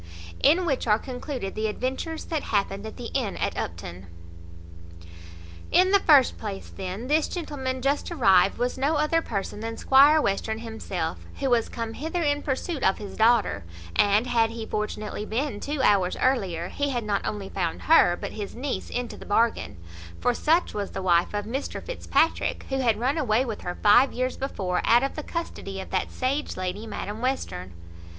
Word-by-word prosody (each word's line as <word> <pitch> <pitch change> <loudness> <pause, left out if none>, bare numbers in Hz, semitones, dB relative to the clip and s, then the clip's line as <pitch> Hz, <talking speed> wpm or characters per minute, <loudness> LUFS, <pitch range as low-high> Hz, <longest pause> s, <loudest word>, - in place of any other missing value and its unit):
In 335 +6 +4
which 275 -6 -1
are 210 -1 +5
concluded 250 -4 -5
the 220 0 -1
adventures 260 +8 -3
that 315 -3 -2
happened 200 0 -1
at 220 - -9
the 240 - -7
inn 245 -8 -1
at - - -1
Upton. 85 +2 -6 1.6
In 370 +1 +5
the 400 - +6
first 290 -8 +5
place, 200 -3 -6
then, 190 +4 -5
this 300 +3 +2
gentleman 265 -7 -4
just 280 +2 0
arrived 200 - +4
was 245 +2 -1
no 285 +4 +2
other 305 +2 +2
person 205 -5 -4
than 225 +1 -5
Squire 285 +4 +6
Western 220 -2 -1
himself, 225 -1 -4 0.2
who 270 -2 0
was 235 -2 +2
come 230 -1 -4
hither 325 +6 -3
in 290 -1 +1
pursuit 285 +3 -3
of 190 - +3
his 205 -2 -8
daughter; 220 - +3 0.3
and, 205 +3 +4
had 230 -2 +2
he 225 -1 -6
fortunately 210 -1 -3
been 225 +1 -2
two 285 +1 -2
hours 190 -5 +3
earlier, 190 -10 0
he 285 0 -1
had 245 -4 -1
not 205 -1 -1
only 200 -2 -4
found 175 -4 -3
her, 310 - +5
but 200 - -5
his 205 -2 -6
niece 265 +3 -3
into 245 -1 -4
the - - -10
bargain; 225 - +1 0.4
for 245 - +2
such 325 +8 +2
was 205 -1 -3
the 190 - -4
wife 175 -1 +3
of 205 0 -2
Mr 260 +6 -4
Fitzpatrick, 415 -9 0
who 270 0 -1
had 230 -5 +2
run 270 +6 +1
away 245 -2 +2
with 225 -4 -5
her 175 - -4
five 215 +6 +6
years 255 +1 -1
before, 190 -9 -2
out 240 +2 +5
of 275 - -1
the 305 - -3
custody 240 -12 -5
of 190 - -8
that - - -1
sage 270 +3 -2
lady, 185 +4 -4
Madam 210 0 -5
Western. 95 - -3
235 Hz, 185 wpm, -26 LUFS, 205-275 Hz, 1.6 s, the